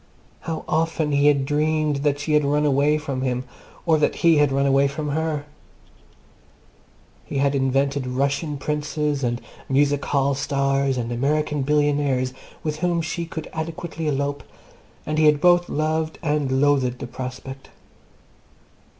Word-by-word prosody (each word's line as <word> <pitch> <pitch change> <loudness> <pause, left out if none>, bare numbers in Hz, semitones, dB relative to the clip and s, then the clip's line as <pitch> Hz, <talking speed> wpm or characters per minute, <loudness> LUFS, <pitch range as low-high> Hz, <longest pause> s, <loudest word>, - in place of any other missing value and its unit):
How 165 -1 -5
often 160 -1 0
he 140 0 +3
had 140 -2 +3
dreamed 150 0 +1
that 145 0 +1
she 145 +2 -2
had 150 0 +4
run 145 +1 +1
away 145 +2 +3
from 140 -4 -4
him 125 -1 -1 0.4
or 160 -2 +3
that 150 - +1
he 165 -2 +6
had 145 -2 +3
run 135 +1 +1
away 140 0 +4
from 145 +2 -4
her! 155 0 -1 1.8
He - - -5
had 140 +1 +2
invented 135 0 0
Russian 140 +4 -1
Princes, 150 0 -2
and 120 -1 0 0.3
Music 140 +1 +2
Hall 140 0 +1
Stars, 140 -1 0
and 120 -1 -3
American 150 +4 0
Billionaires 145 -3 +1 0.3
with 155 -1 -2
whom 170 0 0
she 170 +1 -3
could 160 -1 -6
adequately 160 0 -4
elope, 145 0 -1 0.6
and 155 0 -1
he 155 - +4
had 150 -1 +4
both 175 +1 +4
loved 155 +1 -1
and 145 -4 0
loathed 135 -4 +2
the - - -6
prospect. 130 +2 -7
145 Hz, 150 wpm, -23 LUFS, 135-155 Hz, 1.8 s, he